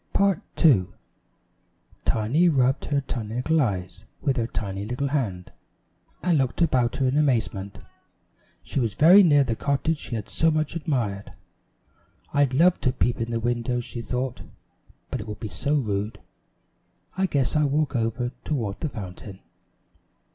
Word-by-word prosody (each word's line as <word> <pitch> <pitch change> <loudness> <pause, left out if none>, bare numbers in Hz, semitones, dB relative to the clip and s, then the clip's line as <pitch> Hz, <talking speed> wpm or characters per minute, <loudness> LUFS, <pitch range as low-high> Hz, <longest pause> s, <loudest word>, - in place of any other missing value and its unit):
Tiny 200 0 +4
is - - -9 0.2
Put - - 0
in 160 - +10
the 125 - +5
Lock 90 - -6
up - - -24 1.1
Tiny 130 +11 +2
rubbed 135 -2 +2
her 140 -1 0
tiny 115 -4 -5
little 155 +6 +2
eyes 95 -5 -3
with 135 -4 0
her 115 -1 0
tiny 100 -4 -4
little 125 +6 -2
hand, 105 -11 -2 0.7
and 175 -4 +3
looked 130 -2 -1
about 125 -7 +1
her 135 - +1
in 135 +4 +2
amazement. 110 -8 0 0.9
She - - -2
was 115 -6 -1
very 180 +7 +8
near 145 -6 +5
the 120 -4 -2
cottage 140 +5 0
she 120 - -4
had 105 -3 -4
so 165 - +2
much 155 0 -1
admired. 120 - -2 1.0
"I'd 140 -2 +2
love 175 +5 +4
to 125 - +2
peep 125 -1 0
in 115 - -2
the 115 -1 -1
windows," 120 +1 -1
she 120 - -5
thought, 125 +1 -3 0.7
"but - - -2
it - - -9
would 105 -1 -6
be 110 - -4
so 140 +8 -1
rude. 105 -5 -2 1.0
I 190 0 +1
guess 140 -5 0
I'll 150 -1 +3
walk 145 0 0
over 120 +1 -1
toward 115 -10 -2
the 155 - -2
fountain." 95 -3 -8
125 Hz, 170 wpm, -25 LUFS, 110-145 Hz, 1.1 s, in